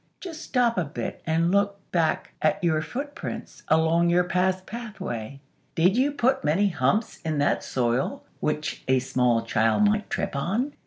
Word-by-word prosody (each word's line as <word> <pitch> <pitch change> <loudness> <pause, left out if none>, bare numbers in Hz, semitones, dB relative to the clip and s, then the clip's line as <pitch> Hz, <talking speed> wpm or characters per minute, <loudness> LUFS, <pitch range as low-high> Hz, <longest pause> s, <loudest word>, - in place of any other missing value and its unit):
Just 330 -4 -7
stop 240 - +1
a - - +1
bit 150 0 -5
and 165 +2 +2
look 200 0 +1
back 165 -3 0
at 155 +5 +1
your 160 -2 +2
footprints 285 - -6
along 160 +2 +3
your 175 +1 +4
past 185 +1 0
pathway. 190 - -6 0.4
Did 180 +5 +4
you 265 +4 +2
put 265 -1 +1
many 185 +7 +2
humps 175 - 0
in 155 -2 -2
that 145 - +1
soil 125 0 -1 0.2
which 150 0 -2
a 130 0 +4
small 125 -2 +1
child 115 - +2
might 210 0 0
trip - - -2
on? 215 - -1
175 Hz, 160 wpm, -25 LUFS, 150-210 Hz, 0.4 s, your